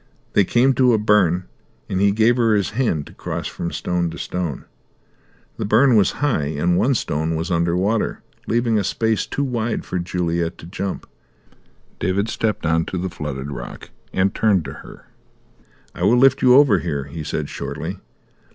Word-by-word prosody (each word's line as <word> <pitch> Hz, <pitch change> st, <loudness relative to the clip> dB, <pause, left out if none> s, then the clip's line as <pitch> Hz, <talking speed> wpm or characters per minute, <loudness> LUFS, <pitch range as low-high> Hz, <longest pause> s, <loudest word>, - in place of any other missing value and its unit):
They 100 Hz, -, +4 dB
came 130 Hz, +6 st, +3 dB
to 125 Hz, -1 st, +4 dB
a -, -, +4 dB
burn, 105 Hz, -4 st, +3 dB, 0.4 s
and 95 Hz, -, -1 dB
he 100 Hz, 0 st, +4 dB
gave 110 Hz, +3 st, +3 dB
her 115 Hz, -3 st, +3 dB
his 100 Hz, -4 st, 0 dB
hand 105 Hz, -, 0 dB
to -, -, -14 dB
cross -, -, -5 dB
from 85 Hz, -, -4 dB
stone 90 Hz, -1 st, -1 dB
to 80 Hz, -, -8 dB
stone. 90 Hz, -6 st, -4 dB, 0.9 s
The -, -, -3 dB
burn 115 Hz, +5 st, +4 dB
was 100 Hz, -4 st, +4 dB
high, 115 Hz, -, +1 dB
and 85 Hz, +4 st, +2 dB
one 130 Hz, +9 st, +2 dB
stone 80 Hz, -5 st, -1 dB
was 80 Hz, +3 st, -3 dB
under 85 Hz, 0 st, +1 dB
water, 105 Hz, +4 st, 0 dB, 0.2 s
leaving 115 Hz, -1 st, +1 dB
a -, -, 0 dB
space 110 Hz, +3 st, 0 dB
too 140 Hz, -, -2 dB
wide 120 Hz, -4 st, -2 dB
for 90 Hz, -, -3 dB
Juliet 85 Hz, -1 st, -2 dB
to -, -, -11 dB
jump. 95 Hz, +3 st, -5 dB, 0.9 s
David 95 Hz, +5 st, 0 dB
stepped 110 Hz, -5 st, -2 dB
on 80 Hz, +1 st, +2 dB
to 95 Hz, -, -4 dB
the 90 Hz, 0 st, -3 dB
flooded 70 Hz, -5 st, -5 dB
rock, -, -, -8 dB, 0.2 s
and 95 Hz, +1 st, +1 dB
turned 100 Hz, -7 st, +2 dB
to 70 Hz, -, -6 dB
her. -, -, -13 dB, 0.9 s
"I -, -, -10 dB
will 120 Hz, -, +4 dB
lift 135 Hz, +1 st, +5 dB
you 125 Hz, -1 st, +6 dB
over 135 Hz, -9 st, +6 dB
here," 75 Hz, -4 st, -3 dB
he 75 Hz, +3 st, -7 dB
said 75 Hz, 0 st, -3 dB
shortly. -, -, -5 dB
95 Hz, 180 wpm, -21 LUFS, 85-115 Hz, 0.9 s, you